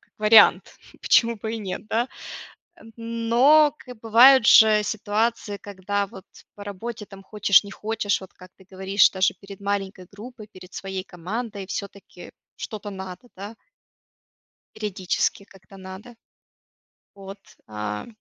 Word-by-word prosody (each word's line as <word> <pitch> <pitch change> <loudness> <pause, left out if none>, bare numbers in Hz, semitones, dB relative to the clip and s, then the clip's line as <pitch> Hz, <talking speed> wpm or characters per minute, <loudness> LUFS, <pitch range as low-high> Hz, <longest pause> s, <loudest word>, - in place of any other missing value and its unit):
как - - -34
вариант. 215 +1 +6 0.4
Почему 235 -1 +3
бы 220 +1 -6
и - - -5
нет, 195 -1 -6
да? 230 +4 -1 0.7
М, 225 -9 -16 0.4
но 290 +5 +5
как 250 -3 -13
бывает, 235 +2 +6
же 215 -1 +6
ситуации, 215 0 -2
когда 200 +1 -4
вот 190 -2 -13 0.3
по 205 - -11
работе 210 +3 -7
там 195 0 -14
хочешь 205 0 +3
не 200 - -10
хочешь, 210 0 -2
вот 190 - -13
как 185 0 -16
ты 190 - -20
говоришь, 190 +1 +2
даже 190 0 0
перед 200 -1 -12
маленькой 195 -2 -4
группой, 220 +2 -12
перед 185 -2 -15
своей 190 -1 -6
командой, 200 +3 -6
всё-таки 200 +1 -9 0.3
что-то 210 -3 -7
надо, 190 +3 -9
да? 200 +4 -9 1.2
Периодически 200 -1 -2
как-то 195 0 -18
надо. 190 +5 -11 1.0
Вот, 195 0 -10 0.3
а. 105 -1 -6
205 Hz, 135 wpm, -23 LUFS, 190-225 Hz, 1.2 s, вариант